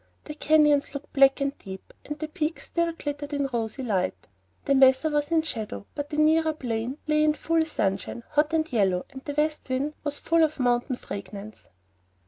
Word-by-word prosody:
The 300 - -7
canyons 295 -2 +3
looked 280 +1 -7
black 275 0 +5
and 275 0 0
deep, 190 0 -10
but 295 - -4
the 310 0 -4
peaks 310 0 -3
still 340 -1 0
glittered 290 -2 -5
in 280 -1 0
rosy 230 +3 -2
light. 195 -6 -1 0.4
The 280 - +3
mesa 265 +3 +5
was 295 0 0
in 325 -1 +2
shadow, 215 - -5
but 290 0 -5
the 300 - -4
nearer 315 +1 +4
plain 245 -2 -3
lay 305 0 +2
in 305 0 +4
full 325 +2 +1
sunshine, 195 - -2
hot 300 +1 +2
and 320 -3 0
yellow, 190 -5 +2
and 265 - -9
the 290 +1 -6
west 300 -1 -1
wind 270 +4 -1
was 290 -1 -2
full 330 0 +2
of 310 -2 0
mountain 245 +1 +1
fragrance. 200 -1 -8
290 Hz, 190 wpm, -26 LUFS, 245-305 Hz, 0.4 s, black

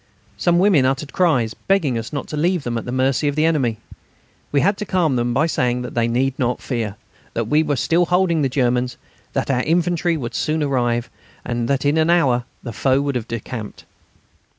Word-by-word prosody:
Some 175 -1 +2
women 180 -6 +4
uttered 135 +2 -1
cries, 130 -11 +2
begging 175 -10 0
us 115 0 -4
not 145 -2 -3
to - - -4
leave 170 +1 +1
them 120 -2 -3
at 115 - -3
the 125 - -4
mercy 130 +3 +1
of 145 - 0
the 155 +1 +2
enemy. 135 -9 +1 0.7
We 140 - +3
had 200 +2 +3
to 210 - -4
calm 170 -7 +1
them 120 0 0
by 135 +6 +2
saying 125 -6 0
that 125 - -7
they 115 -1 +1
need 130 +3 0
not 125 -1 0
fear, 115 -6 -3 0.4
that 115 -2 -1
we 150 +5 +3
were 150 -2 0
still 165 +7 +2
holding 180 -3 +2
the 135 - +1
Germans, 125 -1 0 0.4
that - - -1
our 125 -1 +1
infantry 170 +2 +1
would 120 -5 -5
soon 155 0 0
arrive, 120 -4 0 0.3
and 120 -1 -2
that 140 +1 0
in 145 +3 +3
an 160 +1 +2
hour 130 -8 +3 0.2
the 120 - -6
foe 135 +2 +2
would 140 0 -1
have 120 -3 -3
decamped. 115 -1 -6
135 Hz, 210 wpm, -20 LUFS, 120-160 Hz, 0.7 s, women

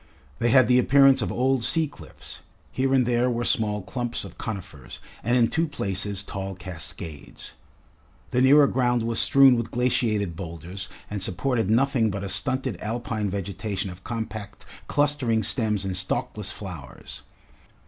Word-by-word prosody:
They 120 - +2
had 130 +1 +6
the 125 +2 +4
appearance 135 +1 +5
of 105 - -2
old 130 -1 +1
sea 160 +5 +2
cliffs; 145 - -12 0.3
here 135 +1 0
and 130 -2 +3
there 120 +1 +2
were 120 -1 -1
small 105 -5 0
clumps 120 +5 -3
of 90 -2 -11
conifers, 95 - -7 0.2
and 120 +3 +2
in 120 -2 +4
two 165 +5 0
places 100 -6 -2
tall 95 -1 -5
cascades. 85 -4 -8 0.8
The 125 - +2
nearer 140 +3 +7
ground 120 -3 +1
was 115 0 0
strewn 135 -2 +6
with 115 -1 -2
glaciated 110 -7 0
boulders 85 +2 -7 0.2
and 105 -2 -5
supported 110 +4 0
nothing 120 -1 +2
but 100 0 -4
a 100 - -4
stunted 130 +1 -1
Alpine 110 -1 -3
vegetation 100 0 -4
of 90 +1 -13
compact 110 -3 -6 0.2
clustering 140 -6 +1
stems 105 -1 +1
and 95 -1 -2
stalkless 105 +3 -1
flowers. 85 - -9
110 Hz, 150 wpm, -25 LUFS, 95-125 Hz, 0.8 s, nearer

